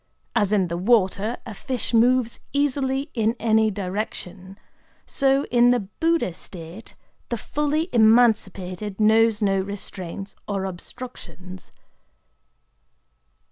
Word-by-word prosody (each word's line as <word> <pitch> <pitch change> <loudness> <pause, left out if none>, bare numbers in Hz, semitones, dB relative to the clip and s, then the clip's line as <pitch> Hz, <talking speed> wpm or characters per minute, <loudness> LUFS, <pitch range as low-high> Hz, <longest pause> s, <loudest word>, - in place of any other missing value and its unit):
As 210 -4 +2
in 195 -4 +2
the 170 0 -3
water 210 +1 +2
a 220 - -7
fish 255 +1 -4
moves 235 +1 +3
easily 280 0 0
in 225 -1 +1
any 220 -1 +3
direction, 190 -1 -5 0.5
so 270 0 +2
in 240 0 +5
the 245 -1 +3
Buddha 320 - 0
state 170 +4 -10 0.3
the 235 - -1
fully 300 +6 -1
emancipated 210 -4 +2
knows 220 0 +4
no 195 -1 +2
restraints 195 -1 -6
or 195 -2 -2
obstructions. 185 -1 -9
220 Hz, 105 wpm, -23 LUFS, 190-245 Hz, 0.5 s, in